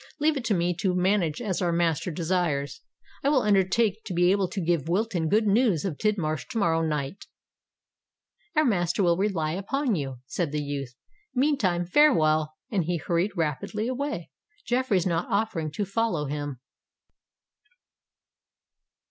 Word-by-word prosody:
"Leave 305 +1 +2
it 270 - -3
to 225 -3 +1
me 175 0 +1
to 180 +1 0
manage 180 -4 +1
as 195 -5 -2
our 175 -2 +1
master 165 -1 +1
desires: 170 - -1 0.4
I 275 - +3
will 275 -4 +3
undertake 205 +2 +2
to 185 - -4
be 175 +1 +4
able 195 -1 +2
to 195 - -5
give 170 -4 0
Wilton 180 -4 0
good 215 +4 +3
news 205 - +2
of 170 -7 -3
Tidmarsh 175 -8 -1
to 265 - -5
morrow 165 -6 +2
night." 150 +2 -3 1.3
"Our 310 0 +4
master 175 -5 +1
will 170 -1 +4
rely 180 -5 0
upon 240 - -1
you," 135 -7 -3
said 155 +3 -2
the 150 0 -2
youth. 140 -3 -5 0.4
"Meantime 235 -11 +1
farewell;"—and 160 - +2
he 175 +1 0
hurried 175 +5 -1
rapidly 165 - -2
away, 255 - -3 0.3
Jeffreys 245 -8 +1
not 170 -2 0
offering 165 -8 0
to 205 - -2
follow 195 -6 -1
him. 145 -2 -4
180 Hz, 150 wpm, -26 LUFS, 160-215 Hz, 1.3 s, be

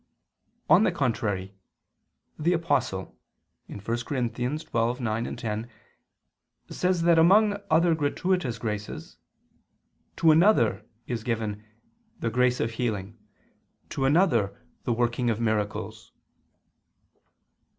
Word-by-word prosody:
On 170 +7 +6
the - - +3
contrary, 100 -7 -2 0.9
The 170 +4 +2
Apostle 165 -1 -1 0.5
(1 100 - -9
Cor. 115 +3 -3
12:9, 120 -2 -2
10) 110 +1 -4 1.0
says 180 -2 0
that 170 -1 +5
among 205 +5 +5
other 165 +2 +4
gratuitous 155 -3 -1
graces, 105 -7 -5 1.0
"to 165 -2 +5
another" 155 - +4 0.2
is 120 -3 -4
given 110 -3 -3 0.6
"the 115 - -2
grace 125 +1 +2
of 115 - -1
healing... 110 -3 -3 0.7
to 135 - -2
another, 130 - +2 0.3
the 125 - 0
working 120 +1 0
of 110 -1 -1
miracles." 110 -3 -2
120 Hz, 100 wpm, -26 LUFS, 110-160 Hz, 1.0 s, On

